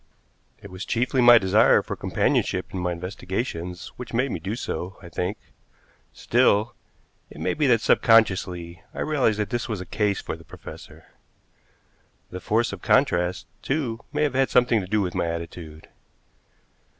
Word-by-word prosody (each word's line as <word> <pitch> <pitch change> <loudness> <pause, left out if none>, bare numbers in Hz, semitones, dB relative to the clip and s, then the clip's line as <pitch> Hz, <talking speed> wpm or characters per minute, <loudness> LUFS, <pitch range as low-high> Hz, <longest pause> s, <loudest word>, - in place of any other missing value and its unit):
It 100 - -12
was 95 +2 -6
chiefly 125 +2 0
my 120 0 +9
desire 100 +1 +4
for - - -5
companionship 90 - 0
in 95 - -3
my 90 0 -1
investigations 90 0 -5
which 120 -2 -7
made 130 +2 +1
me - - -3
do 95 +7 -4
so, 95 -6 -5
I 85 - -10
think; 90 +4 -3 0.7
still, 110 +4 +2 0.6
it - - -12
may - - 0
be 150 -2 +1
that 115 -3 +4
subconsciously 90 -8 +2
I - - -4
realized 135 -8 +1
that 105 +2 -2
this 120 0 -2
was 105 -4 -3
a 95 - -6
case 100 +2 0
for - - -5
the - - -15
professor. - - -12 1.3
The 90 - -6
force 110 +3 0
of 95 - -8
contrast, 90 -10 +2 0.2
too, 130 -6 -2
may 150 +1 0
have 145 -3 0
had 135 0 +2
something 120 -3 +3
to 90 - -7
do 105 +2 +1
with 90 -3 -2
my - - -1
attitude. 85 -1 -7
105 Hz, 165 wpm, -24 LUFS, 90-120 Hz, 1.3 s, my